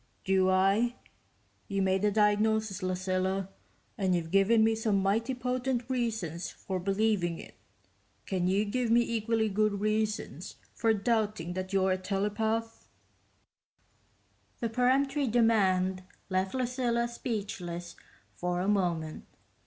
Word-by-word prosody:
"Do 190 -1 +3
I? 195 +6 +3 0.7
You 195 -1 0
made 190 0 +1
the 210 - +3
diagnosis, 210 0 +2
Lucilla, 185 +1 -1 0.5
and 190 -2 +2
you've 165 -2 -3
given 200 +4 +4
me 225 0 +4
some 220 -2 +1
mighty 225 +7 0
potent 250 -1 -2
reasons 220 - -2
for 190 -1 -5
believing 195 -2 0
it... - - -11 0.7
can 180 -2 -1
you 195 +3 +2
give 240 +3 -1
me 235 +1 +5
equally 225 -1 0
good 210 0 +1
reasons 215 - -2 0.2
for 225 -1 +2
doubting 215 -5 0
that 185 +1 -4
you're 190 -1 +2
a 185 - 0
telepath?" 210 +4 -2 1.7
The 230 - -1
peremptory 270 +4 +2
demand 195 -5 +2 0.3
left 190 +4 0
Lucilla 245 -2 0
speechless 195 -7 -5 0.4
for 180 0 -2
a 185 - -1
moment. 175 -6 -1
205 Hz, 120 wpm, -30 LUFS, 185-230 Hz, 1.7 s, me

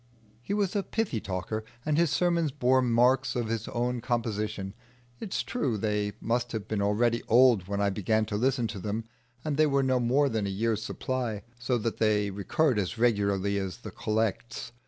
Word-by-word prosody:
He 160 +12 -2
was 200 -2 0
a 200 - +2
pithy 200 - -2
talker, 95 +3 -3 0.2
and 150 -1 +1
his 170 0 +3
sermons 170 0 +2
bore 130 -1 +3
marks 125 +2 +3
of 120 -3 -1
his 115 -1 -2
own 120 0 -1
composition. 110 -5 -2 0.5
It 205 - -6
is - - 0
true, 135 - -1
they 105 -1 -1
must 120 +1 -1
have 110 -2 -4
been 105 -2 -1
already 115 +4 +2
old 120 -5 +5
when 100 0 -2
I 100 0 +2
began 110 +2 +1
to 105 - -4
listen 125 +2 +1
to 105 - -5
them, 105 +4 -3 0.4
and 150 -2 -1
they 155 0 +5
were 140 -1 +2
no 130 -1 +2
more 130 +4 +3
than 110 -5 -1
a - - -2
year's 110 +2 0
supply, 120 -6 -3 0.2
so 125 0 0
that 115 0 -2
they 105 -2 +2
recurred 105 - +1
as 95 +3 -2
regularly 100 -4 +1
as 95 -2 -4
the - - -9
Collects. 110 +3 -2
115 Hz, 195 wpm, -28 LUFS, 105-130 Hz, 0.5 s, old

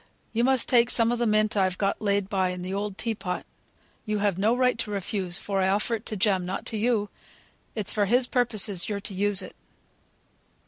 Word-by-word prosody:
You 235 +1 +1
must 260 -1 +2
take 240 -1 +4
some 230 -1 +2
of 240 - -1
the 240 - +1
mint 215 0 +2
I've 185 -2 +1
got 195 -1 -1
laid 200 -2 +1
by 190 -3 0
in 180 0 -5
the 185 +1 -4
old 200 -1 -3
tea 230 -1 -1
pot. 190 -4 -4 0.6
You 215 -1 -2
have 200 -2 +1
no 220 +5 +2
right 250 -1 +3
to 225 - -2
refuse, 195 -2 -1
for 195 -1 -2
I 190 - +2
offer 210 +4 0
it 225 0 -4
to 215 - -3
Jem, 190 -1 +2
not 185 +2 -4
to - - -1
you; 215 -2 +1 0.7
it's 210 -4 0
for 205 -1 +2
his 245 +5 +3
purposes 215 -7 +1
you're 205 -1 -2
to 200 - -6
use 200 0 +2
it." - - -10
205 Hz, 220 wpm, -26 LUFS, 195-230 Hz, 0.7 s, take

